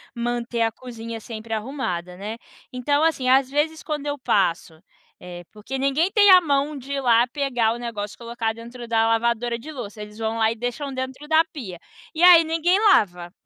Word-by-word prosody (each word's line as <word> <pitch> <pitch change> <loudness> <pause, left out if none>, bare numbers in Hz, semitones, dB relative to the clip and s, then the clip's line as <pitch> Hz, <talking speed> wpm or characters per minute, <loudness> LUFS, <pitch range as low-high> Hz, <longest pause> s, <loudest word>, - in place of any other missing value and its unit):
manter 240 0 -2
a 225 0 +2
cozinha 230 -1 -8
sempre 225 0 -7
arrumada, 210 -7 -4
né? 210 +3 -6 0.3
Então, 285 +4 0
assim, 295 -6 +1
às 265 0 +4
vezes, 305 +2 -1
quando 300 -2 -4
eu 290 0 -2
passo, 175 -8 0 0.4
eh 175 -1 -9
porque 215 +5 -6
ninguém 275 +7 +1
tem 410 -1 +5
a 365 - +9
mão 290 -1 0
de 275 +1 -7
ir 275 - -2
lá 240 -1 +4
pegar 245 -4 0
o - - -6
negócio 220 -4 -5
e - - -39
colocar 235 -1 -3
dentro 235 +1 -10
da 225 -1 +2
lavadora 235 +1 0
de 305 +7 -9
louça. 215 -7 -8
Eles 210 0 -10
vão 225 0 -2
lá 220 0 +2
e - - -4
deixam 245 +4 -4
dentro 260 +3 -6
da 315 +1 +4
pia. 245 - -9 0.3
E 330 +2 -1
aí, 350 -2 +9
ninguém 330 +3 +1
lava. 180 - +2
240 Hz, 195 wpm, -23 LUFS, 225-285 Hz, 0.4 s, a